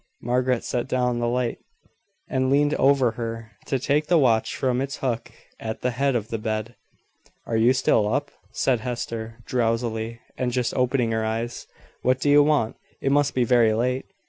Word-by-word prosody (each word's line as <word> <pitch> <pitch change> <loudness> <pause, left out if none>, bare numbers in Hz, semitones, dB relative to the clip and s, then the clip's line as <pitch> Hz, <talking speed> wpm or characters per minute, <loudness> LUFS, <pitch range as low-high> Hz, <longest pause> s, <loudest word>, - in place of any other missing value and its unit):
Margaret 125 0 +1
set 120 0 -2
down 125 -2 0
the 120 - 0
light, 120 0 -1 0.7
and 130 0 0
leaned 145 +2 +3
over 135 -4 +3
her, 115 -1 -6 0.2
to 135 - +1
take 145 +4 0
the 175 - +4
watch 115 -7 +2
from 130 -1 0
its 140 +2 -3
hook 120 -3 -3 0.3
at 110 0 -5
the 125 - 0
head 135 +2 0
of 110 -2 -2
the 115 - -3
bed. 110 +1 -3 0.7
"Are 115 - -2
you 115 +3 +5
still 110 -4 +2
up?" 145 +3 -1 0.2
said 125 -3 +1
Hester, 115 -1 -5
drowsily, 115 -1 -1 0.2
and 125 -1 0
just 125 -1 -1
opening 125 -2 +1
her 110 0 0
eyes. 115 +2 -3 0.3
"What 130 +1 +2
do 145 +2 +2
you 145 0 +7
want? 145 -6 +1 0.2
It 135 - 0
must 145 0 +2
be 125 - +3
very 115 -2 +4
late." 125 +3 0
125 Hz, 180 wpm, -24 LUFS, 115-130 Hz, 0.7 s, you